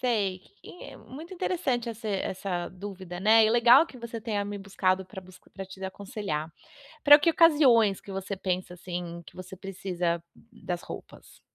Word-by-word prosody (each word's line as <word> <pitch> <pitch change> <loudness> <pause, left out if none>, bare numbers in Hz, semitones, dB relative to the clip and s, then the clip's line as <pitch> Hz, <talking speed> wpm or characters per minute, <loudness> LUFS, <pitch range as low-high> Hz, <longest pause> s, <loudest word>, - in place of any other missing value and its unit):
Sei, 205 -7 0 0.2
e 355 - -11
é - - -10
muito 315 +7 -11
interessante 335 -10 -1
esse 225 -1 -6
essa 190 -2 -2
dúvida, 185 -2 -8
né, 220 +2 +6
e 215 - +3
legal 240 +6 +6
que 260 - -13
você 235 -1 -6
tenha 210 -3 -2
me 205 0 -5
buscado 190 -1 0
pra 190 0 -9
busc 185 0 -16
pra 195 - -7
te 190 0 -12
aconselhar. 190 - -5 0.5
Pra 290 0 +10
que 315 +3 +3
ocasiões 265 - +5
que 200 - -11
você 195 +1 -4
pensa, 185 -1 -3
assim, 175 -1 -6
que - - -15
você 185 +1 -9
precisa 180 -3 -3 0.3
das 185 -6 -5
roupas? - - -11
200 Hz, 170 wpm, -28 LUFS, 185-235 Hz, 0.5 s, Pra